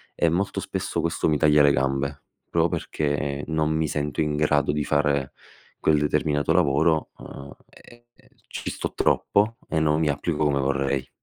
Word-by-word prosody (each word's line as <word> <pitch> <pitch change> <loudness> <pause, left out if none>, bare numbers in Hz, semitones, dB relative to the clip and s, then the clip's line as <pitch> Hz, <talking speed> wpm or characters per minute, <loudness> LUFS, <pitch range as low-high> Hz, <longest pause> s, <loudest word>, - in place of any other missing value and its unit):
e 85 - +2
molto 95 +4 -1
spesso - - -3
questo 85 -1 -1
mi 75 - +2
taglia 75 -1 +5
le 70 - +5
gambe, 70 +1 -1 0.3
proprio - - +2
perché 70 -1 -2
non 80 -1 0
mi 80 0 0
sento 75 +1 -2
in 75 -1 0
grado 75 -1 +2
di 75 0 -1
fare 70 -2 0 0.5
quel 75 - +3
determinato 75 0 +1
lavoro, 80 -1 +2
uhm, 70 +1 -10 0.2
e 120 0 -18
e - - -25 0.2
ci - - -5
sto - - -5
troppo 110 +3 +1
e 80 - 0
non 75 0 +2
mi 80 -2 +1
applico 75 +2 -1
come 70 -2 +1
vorrei. 70 -1 -1
75 Hz, 170 wpm, -24 LUFS, 70-80 Hz, 0.5 s, taglia